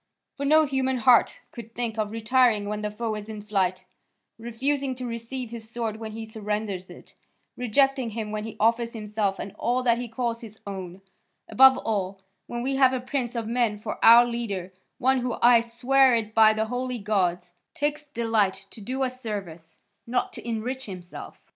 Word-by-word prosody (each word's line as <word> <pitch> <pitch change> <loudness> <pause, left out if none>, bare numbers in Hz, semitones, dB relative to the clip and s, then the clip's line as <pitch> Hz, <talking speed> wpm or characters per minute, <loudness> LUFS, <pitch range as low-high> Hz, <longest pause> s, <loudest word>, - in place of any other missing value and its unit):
For 280 0 -3
no 310 +1 +6
human 265 -2 0
heart 240 0 +4
could 230 -1 -11
think 230 -2 -3
of 210 -1 0
retiring 225 -1 +2
when 210 0 -3
the 210 - -2
foe 220 +1 -3
is 210 0 -6
in 215 -1 -7
flight, 185 -3 -1 0.5
refusing 260 +4 -2
to 255 0 -6
receive 235 +1 -5
his 225 -2 -8
sword 230 -2 -3
when 220 -1 -7
he 225 0 -6
surrenders 210 -3 -4
it, - - -14 0.4
rejecting 260 +1 +1
him 215 -1 -5
when 215 0 -3
he 220 -1 -8
offers 230 +1 +2
himself 210 -3 -2
and 200 - -6
all 245 +2 0
that 235 -1 +3
he 245 - -4
calls 230 0 -3
his 220 -2 -11
own; 190 -1 -7 0.4
above 265 +4 +7
all, 195 -3 -2 0.3
when 240 0 -4
we 270 +1 -1
have 260 -1 +5
a 260 - 0
prince 255 -1 -3
of 230 -1 -2
men 230 -2 0
for 210 - -6
our 235 +1 +9
leader, 205 -6 -4 0.2
one 265 +1 +2
who, 245 -1 -2
I 240 -1 +6
swear 250 +2 +3
it 220 -2 -2
by 220 0 +6
the 215 0 -1
holy 250 +2 -3
gods, 180 -4 -1 0.2
takes 300 -1 -2
delight 215 -7 0
to 220 - -11
do 260 +6 -2
us 255 0 -4
service, 190 -8 -6 0.3
not 245 +1 -1
to - - -9
enrich 250 +4 -3
himself." 180 -3 -9
230 Hz, 185 wpm, -26 LUFS, 210-250 Hz, 0.5 s, our